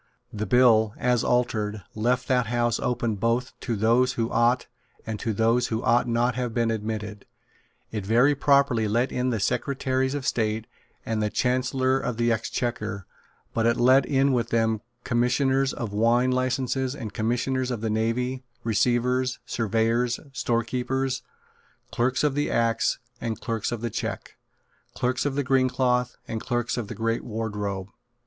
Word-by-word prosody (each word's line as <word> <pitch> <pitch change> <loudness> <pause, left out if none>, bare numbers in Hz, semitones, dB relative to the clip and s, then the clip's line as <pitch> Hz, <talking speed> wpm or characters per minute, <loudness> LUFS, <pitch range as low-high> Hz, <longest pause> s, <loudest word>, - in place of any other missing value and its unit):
The 110 0 -3
bill, 115 -4 +4
as 125 -1 +1
altered, 110 -4 0
left 125 +4 0
that 125 -3 +2
House 120 0 +1
open 120 -3 -1
both 115 +4 0
to 120 - -2
those 120 +5 +3
who 115 0 -2
ought 120 +2 +2 0.4
and 110 -2 -4
to 115 - -1
those 115 +3 +2
who 110 +1 -2
ought 120 0 +3
not 120 +1 +2
to 125 - -10
have 125 -3 -2
been 115 -1 +2
admitted. 105 -1 -4 0.6
It 105 -3 -3
very 120 +8 +4
properly 140 -5 +3
let 120 +5 +1
in 125 +1 0
the 115 -3 -1
Secretaries 130 +4 0
of 140 -2 -4
State 110 -2 0 0.4
and 110 -1 -1
the 105 - +1
Chancellor 130 +2 +1
of 125 -4 -3
the 120 0 +2
Exchequer; 110 -3 -2 0.5
but 115 0 +1
it 115 - +2
let 130 +2 +5
in 135 -1 +2
with 120 -2 0
them 110 -2 +1 0.2
Commissioners 130 +3 +2
of 110 -4 -5
Wine 120 +4 +3
Licenses 130 +1 0
and 115 -8 -6
Commissioners 125 +4 -1
of 120 -4 -3
the 110 - -1
Navy, 120 +4 -1 0.2
Receivers, 125 +3 +1
Surveyors, 115 +1 0
Storekeepers, 125 +2 -1 0.7
Clerks 125 +3 +1
of 150 -2 +2
the 145 +1 0
Acts 115 -1 +1 0.2
and 115 -2 -3
Clerks 115 -3 -2
of 120 -2 -4
the 120 -1 -3
Cheque, - - -5 0.6
Clerks 125 +3 0
of 135 - -2
the 145 - 0
Green 130 -1 +3
Cloth 125 -1 0
and 110 -2 -4
Clerks 120 -1 -1
of 120 -4 -3
the - - -7
Great 115 0 -1
Wardrobe. 105 -4 -4
120 Hz, 160 wpm, -25 LUFS, 110-130 Hz, 0.7 s, let